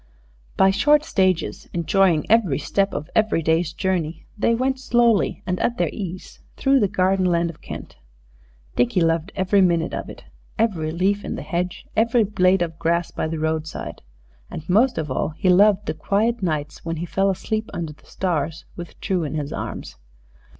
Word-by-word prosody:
By 190 0 +5
short 295 +9 +3
stages, 185 - 0
enjoying 170 -1 +2
every 205 - +3
step 195 +7 0
of 150 +1 -4
every 215 -6 +2
day's 160 +1 +1
journey, 175 -4 -2
they 230 +2 +2
went 260 +2 0
slowly 235 -5 +2
and 180 0 -2
at 235 - 0
their - - 0
ease 185 -3 -7 0.2
through 275 0 +3
the 205 - +3
garden 185 0 +1
land 170 -1 +1
of 160 - -20
Kent. - - -9 0.8
Dickie 120 +8 +2
loved 165 +2 +1
every 190 +1 +3
minute 170 -3 +2
of - - -4
it, - - -11 0.3
every 195 -9 0
leaf 195 +5 0
in - - -4
the - - -6
hedge, 180 +1 -3
every 230 +1 +3
blade 190 -3 +2
of 165 -1 -6
grass 170 +1 0
by - - -2
the 160 0 -3
roadside. 160 0 -3 0.5
And 160 - -8
most 225 +8 +3
of 150 -4 -3
all 150 +4 -2
he 185 - +1
loved 200 +2 +5
the 155 - -2
quiet 210 +8 0
nights 155 -4 -3
when 165 -1 -3
he 165 +2 -4
fell 195 +3 +1
asleep 215 +3 -2
under 165 -3 -4
the - - -24
stars 165 -4 -2
with 175 -1 -9
True 185 -4 0
in 150 -1 -4
his 150 -2 -3
arms. - - -6
180 Hz, 180 wpm, -22 LUFS, 160-205 Hz, 0.8 s, By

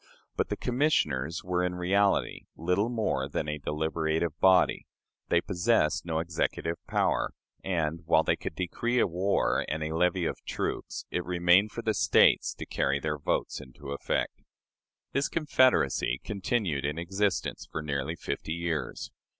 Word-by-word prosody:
But - - -1
the - - -2
commissioners 85 - 0
were 90 0 0
in 90 0 -1
reality 100 +3 +1
little 90 +7 0
more 105 - -1
than 75 +2 -2
a 75 0 -3
deliberative 80 +2 -1
body; 95 -1 +4 0.4
they 85 - +4
possessed 90 -4 +1
no 80 -1 -1
executive 85 0 -2
power, - - 0 0.3
and, 80 -3 -1
while 80 -1 +5
they - - +2
could - - -6
decree 115 +8 -1
a - - +5
war 95 +3 +1
and 80 0 -2
a 80 +1 -3
levy 90 +1 +2
of - - -3
troops, - - -4
it 90 - -1
remained 90 +4 +3
for 115 - -6
the 110 - +1
States - - +4
to - - -7
carry 70 +1 0
their 75 0 -2
votes - - -1
into 65 +2 -10
effect." 70 - -2 0.7
This 140 +2 0
confederacy 130 - +2
continued 100 - -1
in 75 +2 -2
existence 95 +3 -1
for 80 - -4
nearly 70 +2 -2
fifty 80 - -4
years. 85 -5 -3
85 Hz, 150 wpm, -29 LUFS, 80-95 Hz, 0.7 s, while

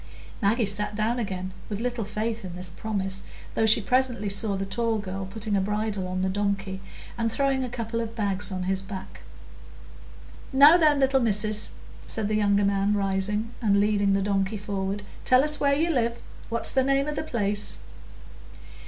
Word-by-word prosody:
Maggie 225 +3 +2
sat 205 +1 -1
down 225 +3 0
again, 185 -4 -4 0.2
with 205 -1 -3
little 240 -1 -2
faith 215 +2 -3
in 180 -2 -7
this 180 -1 -3
promise, 195 0 -4 0.3
though 220 - +2
she 220 +2 +6
presently 245 -1 +1
saw 200 +1 +2
the 195 0 -2
tall 225 +3 -1
girl 195 -2 -5
putting 210 +1 -2
a 195 - +2
bridle 210 -1 -2
on 185 0 -2
the - - +1
donkey, 195 -1 -2 0.4
and 230 -1 0
throwing 270 +1 +1
a 250 - -3
couple 230 -1 -3
of 230 0 -5
bags 205 -2 -1
on 185 -1 -3
his 190 +1 -1
back. 190 -1 -8 1.3
"Now, 285 +5 +8
then, 305 -4 +4
little 270 0 +3
missis," 215 -2 +3 0.4
said 215 -2 -2
the 215 - +1
younger 205 -1 +3
man, 200 +1 +1
rising, 205 +3 0
and 200 -3 +3
leading 205 -1 +2
the 195 0 +1
donkey 195 +1 0
forward, 200 0 -3 0.2
"tell 255 +1 +5
us 300 0 +1
where 280 0 +3
you 330 +4 +1
live; 235 -4 -1 0.3
what's 230 0 0
the 265 - +3
name 275 +1 +2
o' 300 - -1
the - - -2
place?" 210 -8 -1
210 Hz, 180 wpm, -26 LUFS, 195-235 Hz, 1.3 s, Now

